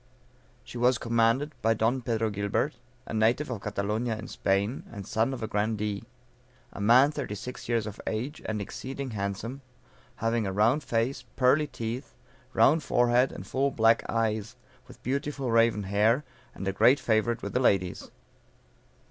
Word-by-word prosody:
She 120 - -8
was 125 0 +4
commanded 115 +6 +1
by 115 0 +3
Don 115 +4 +1
Pedro 115 -2 -1
Gilbert, 100 +9 -1 0.3
a - - -7
native 115 +6 +2
of 110 -5 -4
Catalonia, 105 +3 -2
in 115 - -7
Spain, 100 +6 0
and 100 -4 -7
son 110 +6 0
of 125 -4 -5
a - - -1
grandee; 105 0 -1 0.7
a - - -7
man 125 +7 +6
thirty 140 -8 -4
six 125 +4 -8
years 115 -2 +1
of 105 -1 -7
age, 125 +8 -3
and 110 -1 -2
exceeding 130 +6 -5
handsome, 105 +6 -4 0.5
having 115 -1 0
a - - -2
round 115 +9 +2
face, 125 +3 -1
pearly 140 +4 +3
teeth, 120 0 -5 0.4
round 155 +4 +4
forehead, 120 -1 +3
and - - -8
full 135 +1 0
black 115 -3 +3
eyes, 110 0 -1 0.3
with - - -15
beautiful 140 -1 -2
raven 115 -2 +3
hair, 105 +8 +2 0.3
and 95 - -5
a 95 - 0
great 125 +8 +5
favorite 115 +1 +1
with - - -4
the - - +2
ladies. 95 -7 +1
115 Hz, 160 wpm, -28 LUFS, 105-130 Hz, 0.7 s, man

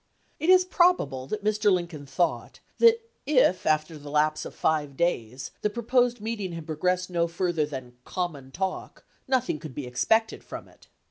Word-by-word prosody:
It 320 - -1
is 370 0 +7
probable 350 - +2
that 215 +4 -4
Mr. 210 -1 +2
Lincoln 170 -6 -2
thought 135 +6 -1 0.2
that 460 0 +5 0.2
if 255 -11 +3
after 155 0 +1
the 145 0 -10
lapse 155 +1 +1
of - - -8
five 145 -3 0
days 130 -7 -1
the 210 - +1
proposed 245 +2 +1
meeting 210 -4 -4
had 165 -2 -7
progressed 180 +4 -1
no 170 -1 +1
farther 170 -2 -1
than 130 -4 -8
"common 155 -7 -4
talk," 190 +6 -4 0.2
nothing 255 - 0
could 150 -4 -9
be 145 - -4
expected 220 - +1
from - - -8
it. - - -21
175 Hz, 170 wpm, -26 LUFS, 150-220 Hz, 0.2 s, is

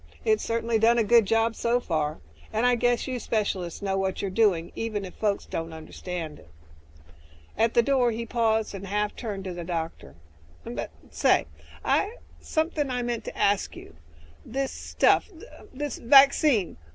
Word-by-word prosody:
It's 435 -1 +2
certainly 230 0 0
done 230 +2 +4
a 230 - +4
good 230 -1 +5
job 225 +1 +2
so 235 +1 +1
far, 155 -8 -2 0.3
and 225 +3 +1
I 250 - +5
guess 245 0 +1
you 255 -2 -3
specialists 200 -6 -2
know 195 -1 0
what 190 -1 -1
you're 195 - -2
doing, 185 -5 +2
even 215 -3 -3
if 185 - -9
folks 205 -2 -1
don't 165 0 -5
understand 160 0 -6
it." - - -18 1.1
At 225 +2 +1
the 235 - +6
door 255 -2 +3
he 230 0 -3
paused 225 -2 0
and 195 0 -7
half 210 +1 -1
turned 205 -5 -5
to 185 -1 -5
the 175 0 -6
doctor, 165 - -5 0.5
"But - - -5 0.2
say... - - +3 0.9
something 315 - -1
I 250 -1 -1
meant 240 -1 -3
to - - -7
ask 200 0 +1
you. - - -12 0.5
This 270 +2 -3
'stuff'... - - +2
er, 395 +5 -14
this 290 +2 -4
vaccine... 270 - +5
225 Hz, 165 wpm, -26 LUFS, 190-240 Hz, 1.1 s, the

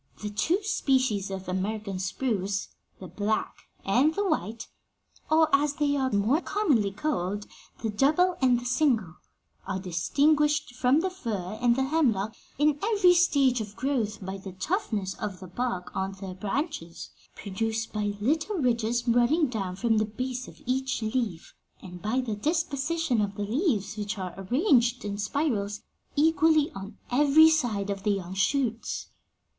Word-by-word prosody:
'The 210 - -3
two 345 - 0
species 260 - +1
of 190 -1 -6
American 195 +1 -3
spruce, 195 0 -2 0.3
the 190 - -8
black 205 +5 -2 0.2
and 265 +11 +3
the 405 0 0
white 230 - -2 0.6
or, 315 +1 +5
as 285 +1 +1
they 290 -1 +1
are 265 -2 +1
more 215 - +2
commonly 290 - +1
called, 205 -4 -2 0.4
the 225 - 0
double 310 - +3
and 250 -2 +4
the 245 - -9
single 245 - +1 0.5
are 190 0 -2
distinguished 290 - +1
from 255 +4 +3
the 375 +1 -1
fir 215 - -4
and 240 -1 +4
the 265 - +1
hemlock 240 -8 +1 0.2
in 295 0 +2
every 405 -4 +4
stage 280 -8 +3
of 210 -1 -7
growth 230 -6 -2
by 190 +1 -4
the 190 -1 -9 0.2
roughness 215 - -1
of 200 -4 -4
the 185 - -9
bark 185 -2 -4
on 190 +1 -2
their 190 -1 -7
branches, 210 - -4 0.2
produced 220 +3 -3
by 210 -1 -1
little 315 - 0
ridges 240 -3 0
running 245 +7 +4
down 200 -8 -3
from 225 +2 +2
the 215 - +2
base 255 +3 -4
of - - -13
each 260 -1 -1
leaf, 215 -7 -2 0.3
and 180 -2 -10
by 220 +5 0
the 235 -5 -2
disposition 300 0 0
of 205 -1 -2
the 205 - -3
leaves, 215 - 0
which 210 0 -3
are 185 -2 -5
arranged 245 - +2
in 200 -1 -3
spirals 210 -4 -1 0.3
equally 315 0 +3
on 195 +1 -9
every 295 +4 +6
side 220 -10 0
of 195 -1 -4
the 210 - 0
young 190 -3 -2
shoots. 230 +3 -1
235 Hz, 155 wpm, -27 LUFS, 200-290 Hz, 0.6 s, every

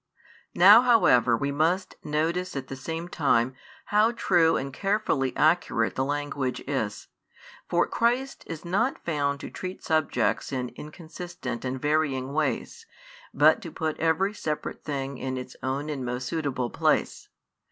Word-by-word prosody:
Now 205 +6 +9
however 150 - +4
we 140 +3 -1
must 165 +6 0
notice 165 +4 -1
at 130 -2 -5
the 135 - -5
same 165 +5 -5
time 135 -7 +1 0.4
how 215 +3 +4
true 170 -7 +3
and 135 0 -4
carefully 195 -9 0
accurate 155 -8 +2
the 130 - -1
language 145 -2 -2
is, 110 -7 -3 0.6
for 175 0 +3
Christ 245 +4 0
is 165 +1 -7
not 210 +10 0
found 145 -3 0
to - - -7
treat 185 0 -7
subjects 155 -2 0
in 125 -2 -2
inconsistent 155 -4 -7
and 130 0 -3
varying 140 -3 0
ways, 155 - -2 0.4
but - - +4
to - - -8
put 160 -2 -2
every 165 +6 +1
separate 155 -7 -4
thing 140 -3 -4
in 130 0 -3
its 125 0 -7
own 135 +3 -2
and 145 -4 -4
most 125 +1 -3
suitable 140 -7 -2
place. - - 0
150 Hz, 145 wpm, -26 LUFS, 130-175 Hz, 0.6 s, Now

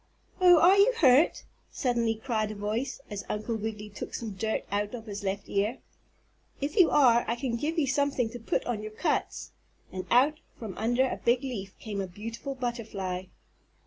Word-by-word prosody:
"Oh, 355 -2 +7
are 370 +4 +6
you 420 +5 +6
hurt?" 275 - +5 0.3
suddenly 235 -4 0
cried 220 -2 -2
a 215 - -6
voice, 220 +7 -3
as 200 -1 -4
Uncle 215 +2 -2
Wiggily 210 -1 -5
took 205 - -7
some 225 -2 -4
dirt 220 +3 -2
out 205 +3 -1
of 225 -2 -9
his 205 -1 -6
left 195 +1 -3
ear. 205 +5 0 0.8
"If 285 +6 -3
you 370 -6 +6
are 240 -5 +5
I 235 - 0
can 240 -1 -2
give 305 +8 -2
you 310 - +3
something 280 -2 +1
to 245 - -7
put 230 - -1
on 235 -4 -2
your 215 0 -7
cuts," - - -2 0.4
and 185 -1 -6
out 285 +5 +4 0.2
from 215 -5 -7
under 240 +4 +1
a - - -5
big 240 +3 +3
leaf 200 -8 -5
came 205 -2 -4
a 190 - -3
beautiful 230 +8 -6
butterfly. 215 -7 -4
230 Hz, 185 wpm, -28 LUFS, 210-265 Hz, 0.8 s, Oh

